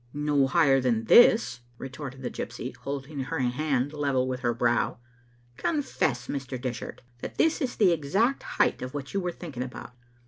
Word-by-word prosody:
" 120 Hz, -, -31 dB, 0.2 s
"No 140 Hz, -2 st, +4 dB
higher 135 Hz, -2 st, +4 dB
than 120 Hz, -3 st, +1 dB
this," 225 Hz, -, +6 dB, 0.2 s
retorted 135 Hz, 0 st, -7 dB
the 125 Hz, -, -3 dB
gypsy, 120 Hz, +2 st, -6 dB
holding 140 Hz, +1 st, -5 dB
her 135 Hz, -, -3 dB
hand 135 Hz, +2 st, 0 dB
level 140 Hz, -4 st, 0 dB
with 130 Hz, -1 st, -2 dB
her 120 Hz, -2 st, +1 dB
brow. 120 Hz, 0 st, +1 dB, 0.3 s
" 120 Hz, 0 st, -33 dB
Confess, 160 Hz, -, 0 dB
Mr. 135 Hz, -2 st, -4 dB
Dishart, 125 Hz, -3 st, -5 dB, 0.2 s
that -, -, -7 dB
this 320 Hz, +1 st, +2 dB
is 255 Hz, -3 st, -1 dB
the 195 Hz, -5 st, +4 dB
exact 195 Hz, -, +1 dB
height -, -, 0 dB
of 130 Hz, +2 st, -6 dB
what 140 Hz, -2 st, -5 dB
you 200 Hz, -, +1 dB
were 180 Hz, -2 st, -2 dB
thinking 155 Hz, -8 st, -7 dB
about. 125 Hz, -1 st, -7 dB
135 Hz, 180 wpm, -27 LUFS, 125-155 Hz, 0.3 s, this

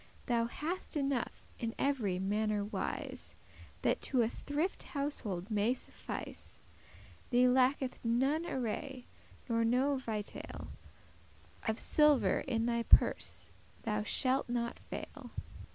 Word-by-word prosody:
Thou 235 Hz, -2 st, +2 dB
hast 315 Hz, +8 st, -3 dB
enough, 275 Hz, -4 st, -1 dB
in 230 Hz, 0 st, -2 dB
every 240 Hz, -10 st, +1 dB
manner 205 Hz, +2 st, 0 dB
wise, 210 Hz, -, -4 dB, 0.5 s
That -, -, +2 dB
to 255 Hz, -4 st, +3 dB
a 225 Hz, -, +1 dB
thrifty 300 Hz, +9 st, -2 dB
household 230 Hz, -, -3 dB
may 215 Hz, +4 st, +3 dB
suffice. -, -, -7 dB, 0.7 s
Thee 250 Hz, 0 st, +5 dB
lacketh 255 Hz, +1 st, +2 dB
none 270 Hz, +8 st, +2 dB
array, 255 Hz, +2 st, -3 dB, 0.4 s
nor 230 Hz, -2 st, +2 dB
no 260 Hz, +5 st, +3 dB
vitail; 220 Hz, -5 st, -5 dB, 1.0 s
Of 220 Hz, +1 st, +1 dB
silver 300 Hz, -3 st, +4 dB
in 230 Hz, -3 st, 0 dB
thy 235 Hz, 0 st, +1 dB
purse -, -, +3 dB, 0.3 s
thou 210 Hz, -2 st, 0 dB
shalt 255 Hz, +4 st, +2 dB
not 235 Hz, -1 st, -1 dB
fail." -, -, -7 dB
245 Hz, 115 wpm, -34 LUFS, 225-275 Hz, 1.0 s, Thee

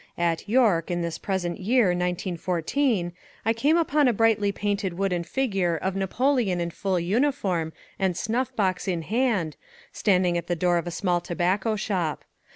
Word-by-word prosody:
At 170 Hz, +2 st, -1 dB
York, 215 Hz, -9 st, +3 dB
in 175 Hz, -1 st, -1 dB
this 170 Hz, -1 st, -4 dB
present 185 Hz, -3 st, -2 dB
year, 220 Hz, +1 st, +3 dB
1914, 180 Hz, -, -1 dB, 0.3 s
I 225 Hz, -, +3 dB
came 285 Hz, +8 st, +2 dB
upon 300 Hz, -4 st, +3 dB
a 245 Hz, -, +3 dB
brightly 215 Hz, -2 st, +2 dB
painted 200 Hz, -3 st, -2 dB
wooden 190 Hz, -3 st, 0 dB
figure 195 Hz, -6 st, 0 dB
of 190 Hz, +4 st, -2 dB
Napoleon 210 Hz, 0 st, +1 dB
in 170 Hz, 0 st, -2 dB
full 190 Hz, 0 st, -1 dB
uniform 185 Hz, -, 0 dB, 0.3 s
and 190 Hz, -3 st, 0 dB
snuff 235 Hz, +6 st, -1 dB
box 190 Hz, -3 st, 0 dB
in 175 Hz, -3 st, -1 dB
hand, 215 Hz, -7 st, 0 dB, 0.4 s
standing 180 Hz, -4 st, +2 dB
at 170 Hz, -, -9 dB
the 175 Hz, -, 0 dB
door 175 Hz, +1 st, +2 dB
of 170 Hz, -, -6 dB
a -, -, -1 dB
small 175 Hz, 0 st, 0 dB
tobacco 190 Hz, +5 st, 0 dB
shop. 185 Hz, -7 st, -2 dB
190 Hz, 165 wpm, -25 LUFS, 175-220 Hz, 0.4 s, York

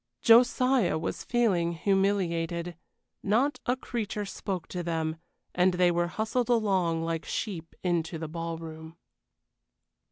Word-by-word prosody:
Josiah 245 Hz, -3 st, +5 dB
was 160 Hz, -, -4 dB
feeling 190 Hz, -9 st, +1 dB
humiliated. 175 Hz, -2 st, 0 dB, 0.5 s
Not 240 Hz, +9 st, +1 dB
a 250 Hz, -, +3 dB
creature 215 Hz, -5 st, -4 dB
spoke 190 Hz, -3 st, -4 dB
to 180 Hz, -, -3 dB
them, 160 Hz, -2 st, -2 dB, 0.4 s
and 180 Hz, 0 st, +3 dB
they 180 Hz, -1 st, +4 dB
were 175 Hz, 0 st, +1 dB
hustled 220 Hz, +6 st, -1 dB
along 190 Hz, -8 st, +2 dB
like 165 Hz, -1 st, -2 dB
sheep 175 Hz, -7 st, -4 dB
into 170 Hz, -2 st, 0 dB
the 160 Hz, 0 st, -5 dB
ballroom. 165 Hz, 0 st, -6 dB
175 Hz, 120 wpm, -28 LUFS, 165-215 Hz, 0.5 s, Josiah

